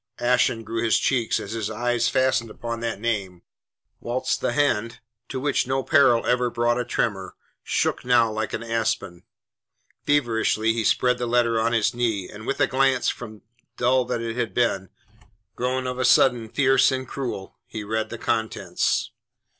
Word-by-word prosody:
Ashen 120 -2 +2
grew 115 +2 -3
his 115 - +3
cheeks 125 -4 +1
as 100 - -7
his 110 -2 -3
eyes 120 +1 0
fastened 130 -3 +1
upon 115 +1 -5
that 115 -3 -3
name, 100 -6 -3 0.6
whilst 130 +2 -2
the - - 0
hand, 115 -6 0 0.3
to 130 - -4
which 140 -1 0
no 135 0 0
peril 140 -7 +4
ever 125 0 +2
brought 120 +1 0
a - - 0
tremor, 100 -5 -2 0.3
shook - - -1
now 120 -2 +3
like 110 0 -3
an - - -3
aspen. 110 -6 -2 0.8
Feverishly 115 -5 +1
he 115 -1 -1
spread 125 +3 +2
the 120 - -2
letter 120 -1 +2
on 115 +1 +1
his 115 -2 +2
knee, 115 -6 -1
and 110 +2 -11
with 135 - -2
a 145 - +5
glance, 130 -1 +2
from 110 -3 -7 0.3
dull 125 +1 +3
that 120 -1 -2
it 115 -1 -4
had 115 -6 -3
been, 100 -6 0 0.7
grown 130 +1 -1
of 125 0 -4
a - - +1
sudden 120 -3 +4
fierce 135 +1 +3
and 130 -1 -3
cruel, 120 -8 -6
he 110 - -6
read 110 +1 -2
the 120 - -6
contents. 110 0 -1
120 Hz, 170 wpm, -24 LUFS, 110-125 Hz, 0.8 s, a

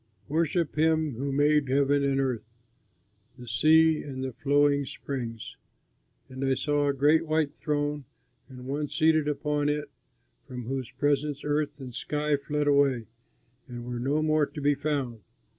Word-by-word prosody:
Worship 165 +1 0
him 160 -2 +2
who 135 +4 -3
made 145 0 +2
heaven 140 +1 +2
and 135 -1 +1
earth, 125 -5 -2 0.9
the 125 -1 -11
sea 155 +7 +4
and 130 -2 -6
the 130 -1 -4
flowing 145 +2 +2
springs." 120 -4 -6 0.7
And 130 +1 -6
I 135 -1 +2
saw 145 +1 0
a 140 - +2
great 150 +4 +3
white 155 -2 +1
throne 145 -2 -2 0.4
and 125 -1 -11
One 145 +3 -2
seated 155 0 +2
upon 150 0 0
it 150 0 -2 0.6
from 125 -2 -7
whose 130 0 -4
presence 145 +2 -1
earth 145 -1 -1
and 130 -2 -8
sky 150 +3 -1
fled 145 +1 -2
away, 140 -5 +3 0.6
and 120 -2 -8
were 120 -1 -4
no 145 +5 0
more 155 -1 +2
to 150 - -9
be 145 0 +3
found. 140 -6 -2
145 Hz, 155 wpm, -27 LUFS, 130-150 Hz, 0.9 s, sea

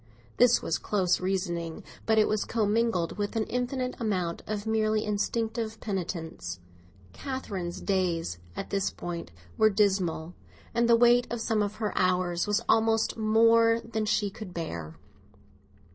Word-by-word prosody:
This 245 -1 +5
was 160 - -1
close 185 -4 +1
reasoning; 175 -3 -2 0.2
but 220 0 +3
it 215 - +5
was 215 -1 0
commingled 215 -5 0
with 205 +2 -2
an 225 - +1
infinite 250 +2 -2
amount 185 -6 -1
of 210 -1 -3
merely 215 -1 +1
instinctive 220 +1 -2
penitence. 175 - -4 0.5
Catherine's 200 -10 -5
days 175 - -1 0.2
at - - -6
this 195 -1 +1
time 170 -1 -6 0.3
were 220 - +6
dismal, 190 -5 +1 0.4
and 235 0 +2
the 235 - +7
weight 240 +1 +5
of 240 - -3
some 225 -1 0
of 205 0 -1
her 215 -2 -3
hours 180 -1 +1
was 210 +2 +1
almost 225 0 +3
more 230 +1 +4
than 225 -1 -3
she 210 -1 +1
could 195 -3 -9
bear. 85 - -5
210 Hz, 145 wpm, -28 LUFS, 180-225 Hz, 0.5 s, the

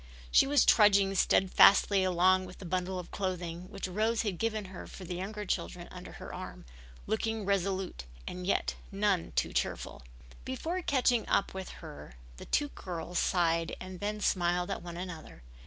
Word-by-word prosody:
She - - +6
was 285 -2 +4
trudging 200 -2 +5
steadfastly 195 +1 +5
along 185 +1 +3
with 180 - -12
a 190 - -8
bundle 185 +1 -2
of 180 - -7
clothing 180 -2 -4
which 200 -2 -5
Rose 220 +5 0
had 200 -6 -3
given 220 -2 -1
her 180 - -8
for 190 - -10
the 180 - -5
younger 205 +4 -5
children 85 - -3
under - - -9
her - - -9
arm, - - -8 0.4
looking 220 -1 -1
resolute 190 - -1 0.2
and 180 0 -6
yet - - +1 0.2
none 195 -3 +1
too - - 0
cheerful. - - -2 0.4
Before 325 +8 -3
catching 250 -7 +2
up 200 - +2
with 190 -1 -6 0.2
her 145 - -10 0.2
the - - -9
two 290 -1 +1
girls 175 - -4
sighed 165 -2 +1
and 185 -1 -8
then 210 +1 -3
smiled 180 -2 +1
at - - -3
one 170 -1 -7
another. 175 - -8
190 Hz, 170 wpm, -31 LUFS, 180-210 Hz, 0.4 s, She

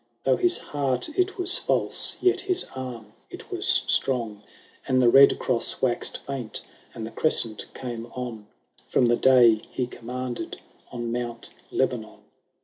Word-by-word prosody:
Though - - +3
his 355 -2 +2
heart 135 - -1
it 370 +5 -1
was 365 0 +3
false, - - +2
yet 370 0 +2
his 375 -1 0
arm 120 -5 -7 0.2
it - - -11
was - - +2
strong; 115 -6 -1 0.5
And 130 - +2
the 120 -2 +5
Red 140 +2 +7
cross 120 -3 0
waxed 125 -2 +1
faint, 130 -5 -5 0.3
and 110 - -5
the 115 - -8
Crescent 115 -8 0
came 120 -2 -6
on, 120 -4 -6 0.4
From - - +2
the 120 0 +3
day 120 -4 +5
he 125 - -2
commanded 125 +1 -6 0.3
on 120 -1 -4
Mount 120 -1 -5 0.2
Lebanon. - - -2
125 Hz, 145 wpm, -25 LUFS, 115-135 Hz, 0.5 s, Red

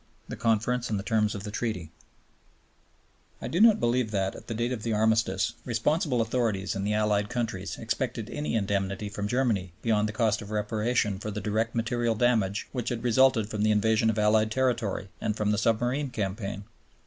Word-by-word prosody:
The - - -5
Conference 115 +2 0
and 105 - 0
the 100 - -4
Terms 110 -1 +1
of 100 - -6
the 105 - -5
Treaty 95 -8 -3 1.5
I - - -5
do 175 - 0
not 220 -1 +7
believe 120 -1 +1
that, 95 -2 -1
at - - -12
the 115 - -4
date 120 +2 -1
of 120 -4 -3
the 115 0 -1
Armistice, 110 -3 +2
responsible 125 +2 +1
authorities 110 -4 -1
in 100 - -2
the 105 +1 0
Allied 105 -1 +1
countries 110 -6 -3
expected 115 -1 -3
any 150 -5 -2
indemnity 100 -1 -1
from 105 0 -3
Germany 105 -7 0
beyond 110 -2 +2
the - - -5
cost 110 -1 +1
of 105 - -9
reparation 105 -1 0
for 105 - -5
the 105 0 -4
direct 110 +2 -1
material 115 0 0
damage 110 -3 +1
which 125 -3 -3
had 120 -1 -3
resulted 125 -2 +4
from 105 - -2
the 110 - +3
invasion 110 +1 +3
of 110 - -1
Allied 110 +1 +3
territory 115 -6 -1
and 105 - -1
from 105 -1 +1
the 105 - +1
submarine 120 +5 +1
campaign. 100 -2 -4
110 Hz, 190 wpm, -28 LUFS, 105-120 Hz, 1.5 s, not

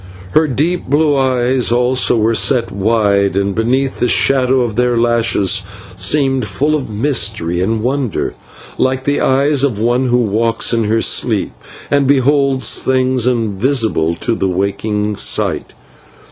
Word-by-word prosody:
Her 155 +6 +2
deep 155 +7 -2
blue 145 +1 +2
eyes 130 -2 +1
also 125 0 +2
were 110 +1 +1
set 120 +1 +1
wide, 100 -1 +1
and, 100 0 0
beneath 130 +5 -1
the 125 - +1
shadow 130 +1 +2
of 115 -4 -2
their 125 -1 +1
lashes, 115 -5 +1 0.3
seemed 135 0 0
full 140 +11 -1
of 145 -6 -3
mystery 105 - -1
and 110 +3 -1
wonder, 130 -3 -2 0.5
like 130 0 0
the 145 +1 0
eyes 140 +1 +1
of 130 -7 0
one 120 +3 0
who 120 0 +2
walks 115 +3 0
in 115 -1 0
her 110 +2 0
sleep - - 0 0.4
and 140 -1 +2
beholds 135 -2 +2
things 130 -2 0
invisible 110 - 0
to 115 +7 -3
the 95 -4 -1
waking 105 +2 -2
sight. - - -1
120 Hz, 145 wpm, -15 LUFS, 105-135 Hz, 0.5 s, Her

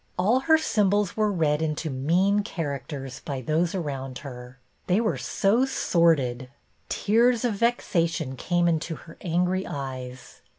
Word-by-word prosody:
All 210 +8 +3
her 320 +4 +4
symbols 205 - +1
were 215 -1 +2
read 155 -5 +1
into 155 0 -2
mean 175 +10 +2
characters 140 - -5
by 140 -2 -4
those 160 +7 0
around 135 -7 -4
her; 125 -1 -9 0.3
they 185 +3 +3
were 225 -2 0
so 215 +6 +2
sordid. 150 - +1 0.4
Tears 235 +3 +2
of 235 - +1
vexation 170 - 0
came 175 +6 +1
into 165 0 0
her 165 +2 -14
angry 180 +2 0
eyes. 130 -3 -7
170 Hz, 135 wpm, -26 LUFS, 140-200 Hz, 0.4 s, her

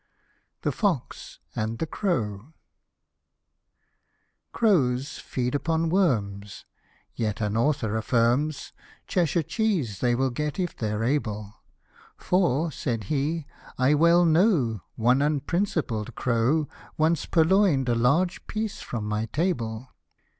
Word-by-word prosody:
THE - - +1
FOX 185 - -2 0.2
AND 110 +1 -2
THE 160 - -2
CROW. 130 - -2 2.0
CROWS 140 - +1
feed 125 -1 -3
upon 160 +2 0
worms: 105 - 0 0.5
yet 105 -3 -2
an 105 -1 -1
author 115 -3 +1
affirms, 120 +6 0 0.3
Cheshire 170 -2 +1
cheese 165 - -1
they 120 -1 +2
will 130 +1 0
get 150 +7 -3
if 180 -2 -2
they're 105 -1 -2
able, 110 -6 -1 0.3
" - - -40 0.3
For," 170 -3 +1
said 115 -8 -3
he, 150 +3 -1 0.2
" - - -22
I 130 +3 +3
well 170 +3 +5
know, 160 - +3
one 125 +4 +3
unprincipled 150 - -1
crow., 130 +6 +1 0.3
Once 160 0 +1
purloin'd 165 -5 +3
a 120 - +2
large 140 +11 +1
piece 215 -1 -3
from 110 -3 -4
my 105 +1 -1
table." 125 - -2
140 Hz, 120 wpm, -26 LUFS, 115-165 Hz, 2.0 s, well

